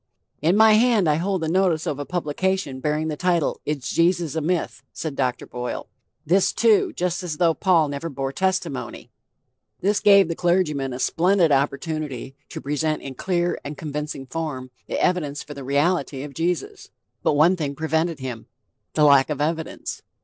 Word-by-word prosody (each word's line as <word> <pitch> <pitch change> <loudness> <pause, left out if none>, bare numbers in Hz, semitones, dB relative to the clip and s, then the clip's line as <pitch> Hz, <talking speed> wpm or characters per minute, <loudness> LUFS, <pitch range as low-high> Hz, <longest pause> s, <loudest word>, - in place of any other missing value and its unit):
"In 170 +6 +3
my 220 0 +7
hand 220 -4 +4
I 150 -1 +3
hold 185 0 -1
the - - -1
notice 175 -2 +1
of 145 - -2
a 145 - -5
publication 175 -3 -1
bearing 150 +3 -1
the 155 - -2
title 175 -1 0
Is 145 -3 -2
Jesus 170 -3 +1
a 160 - -1
Myth?" 175 +2 -1
said 155 -4 -5
Dr. 125 -2 -1
Boyle. 125 0 -5 0.4
"This, 185 +5 +3
too, 225 -3 +3
just 180 0 -1
as 170 -4 -4
though 170 -2 +3
Paul 170 -3 +3
never 145 +4 -4
bore 135 -2 -3
testimony." 185 -6 -2 0.7
This 200 +2 +2
gave 200 -3 +6
the 165 - -2
clergyman 160 -7 +1
a 125 - -4
splendid 175 +4 +2
opportunity 140 -1 -1
to - - -6
present 150 +2 -1
in 135 - -6
clear 175 +4 -1
and 145 0 -6
convincing 150 -2 -5
form 135 -3 -5 0.2
the - - -2
evidence 150 -6 0
for 150 - -9
the 140 -1 -8
reality 140 0 0
of 145 -1 -8
Jesus. 180 - -3 0.3
But - - +2
one 160 +6 +5
thing 145 -5 -3
prevented 160 +2 0
him: 125 -4 -6 0.5
the 155 - +3
lack 140 -1 +6
of 150 -2 -3
evidence. 160 +2 -3
160 Hz, 175 wpm, -23 LUFS, 140-180 Hz, 0.7 s, my